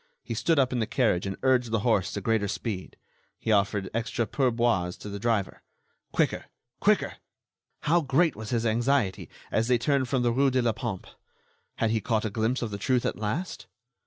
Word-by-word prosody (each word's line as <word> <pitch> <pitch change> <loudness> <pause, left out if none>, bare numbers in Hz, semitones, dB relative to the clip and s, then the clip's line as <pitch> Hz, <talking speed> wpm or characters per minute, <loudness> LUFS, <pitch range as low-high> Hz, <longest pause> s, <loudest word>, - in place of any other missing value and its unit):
He - - -4
stood 165 -2 +1
up 130 -2 +3
in 125 - 0
the 110 - 0
carriage 105 -8 +1
and 95 - -4
urged 125 -2 +3
the 110 -2 0
horse 110 -6 +2
to 100 - -3
greater 110 0 +1
speed. 95 0 -4 0.4
He 115 - -2
offered 100 -1 +2
extra 115 +1 -1
pourboires 115 -9 +1
to 105 - -8
the 100 0 -5
driver. 105 -3 -1 0.5
Quicker! - - 0 0.3
Quicker! - - +2 0.6
How 170 +3 +3
great 155 +3 +2
was 110 0 -7
his 120 -1 0
anxiety 115 -2 +1 0.2
as 110 +1 +1
they 125 -1 +4
turned 135 0 +1
from 130 -2 +1
the 120 - +3
rue 135 +3 +3
de 130 -1 +1
la 115 - +3
Pompe! 110 -5 -4 0.7
Had 115 - +1
he 110 -1 +1
caught 110 +1 0
a 110 - -2
glimpse 115 +4 0
of 110 - -3
the 100 - -5
truth 125 0 +1
at - - 0
last? 110 - -3
115 Hz, 195 wpm, -27 LUFS, 105-130 Hz, 0.7 s, they